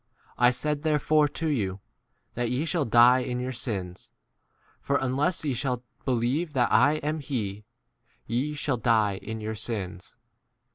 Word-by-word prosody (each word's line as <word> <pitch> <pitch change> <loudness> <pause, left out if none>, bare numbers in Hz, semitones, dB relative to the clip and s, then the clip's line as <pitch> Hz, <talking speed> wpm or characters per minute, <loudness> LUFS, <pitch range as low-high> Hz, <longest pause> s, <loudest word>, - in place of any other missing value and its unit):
I 120 0 +5
said 150 +3 -1
therefore 155 -1 +3
to 160 +3 -4
you, 100 -10 -1 0.5
that 120 -1 -1
ye 130 +5 -1
shall 165 -3 0
die 120 +3 +6
in 125 -1 -3
.your 125 +1 -3
sins; 100 -7 -5 0.7
for 140 - -1
unless 140 +7 0
ye 140 - 0
shall 125 0 -2 0.2
believe 130 +6 0
that 125 -3 +2
I 125 +7 +5
" - - -26
am 155 +1 0
5 145 - -10
[he], 105 -7 -3 0.6
ye 130 +6 -1
shall 140 -3 -1
die 110 -4 +2
in 110 +2 -6
your 110 +1 -3
sins. 100 -5 -5
125 Hz, 160 wpm, -27 LUFS, 110-145 Hz, 0.7 s, die